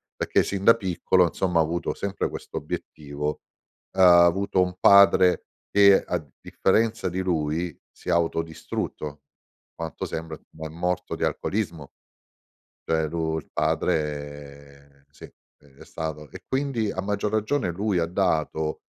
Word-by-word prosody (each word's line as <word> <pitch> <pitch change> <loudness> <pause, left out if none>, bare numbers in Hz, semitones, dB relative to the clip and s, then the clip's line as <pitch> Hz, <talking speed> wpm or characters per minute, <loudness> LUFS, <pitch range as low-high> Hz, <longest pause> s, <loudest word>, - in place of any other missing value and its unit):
perché - - +1
sin 100 -1 -3
da 115 - +8
piccolo, 95 -3 +2
insomma, 90 +1 0
ha - - +6
avuto 85 +2 -1
sempre 100 0 -3
questo - - -7
obiettivo. 75 0 -5 0.5
Uhm, 95 - 0
ha 85 -1 +8
avuto 95 +2 +2
un 90 0 -3
padre 100 -2 +6 0.3
che 100 -1 +6
a 90 - -1 0.2
differenza 115 +3 +1
di 95 +2 -2
lui, 85 -1 -1 0.2
si - - -10
è - - +3
autodistrutto, 80 -3 -2 0.5
quanto 80 -2 -6
sembra 80 -1 -5 0.2
ma 80 0 -5
è - - -10
morto 90 +3 -2
di - - -4
alcolismo. 85 -9 -2 0.9
Cioè 80 -1 +1
lu 80 -1 -2
il - - -16
padre, 70 -2 -3
sì, - - -16
ehm, 70 -1 -24
è - - -11
stato 75 -2 -6
e - - -11
quindi, 130 -6 -1
a 95 - -3
maggior 105 +1 -2
ragione, 110 -1 0
lui 100 0 0
ha 85 - +1
dato 80 -3 -1
85 Hz, 145 wpm, -25 LUFS, 75-95 Hz, 0.9 s, da